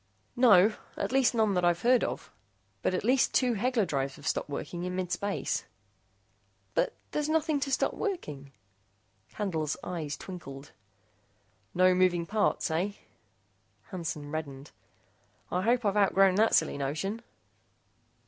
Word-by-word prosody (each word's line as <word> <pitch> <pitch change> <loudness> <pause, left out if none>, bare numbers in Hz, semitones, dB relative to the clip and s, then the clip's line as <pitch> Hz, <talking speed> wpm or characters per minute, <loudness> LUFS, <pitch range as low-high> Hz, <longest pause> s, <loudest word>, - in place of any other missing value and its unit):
"No. 215 -5 +6 0.2
At - - -2
least 265 -2 +3
none 220 -3 +2
that 180 -1 0
I've 175 0 +2
heard 245 0 +4
of. - - -4 0.5
But 185 - 0
at - - -2
least 255 +3 +2
two 250 -2 +3
Hegler 230 0 +1
drives 135 -3 -2
have 145 - -9
stopped - - -1
working 160 +4 -5
in 180 0 -3
mid 185 -1 -3
space." 200 0 -2 1.1
"But, - - +2 0.2
but - - -41
there's 300 0 -1
nothing 315 -1 +1
to 275 0 -3
stop 270 - +1
working 150 - -4 0.4
" 105 +2 -42
Candle's 160 -8 -2
eyes 155 -5 -4
twinkled. 145 -7 -9 1.0
"No 185 +1 +5
moving 180 -2 +2
parts, 205 -3 0
eh?" 180 +6 0 1.0
Hansen 165 -5 -5
reddened. 145 -3 -6 0.8
"I 180 - 0
hope 235 +3 +1
I've 200 -1 +1
outgrown 195 -2 +4
that 220 +4 +3
silly - - +1
notion." 160 +11 -3
185 Hz, 145 wpm, -29 LUFS, 155-225 Hz, 1.1 s, No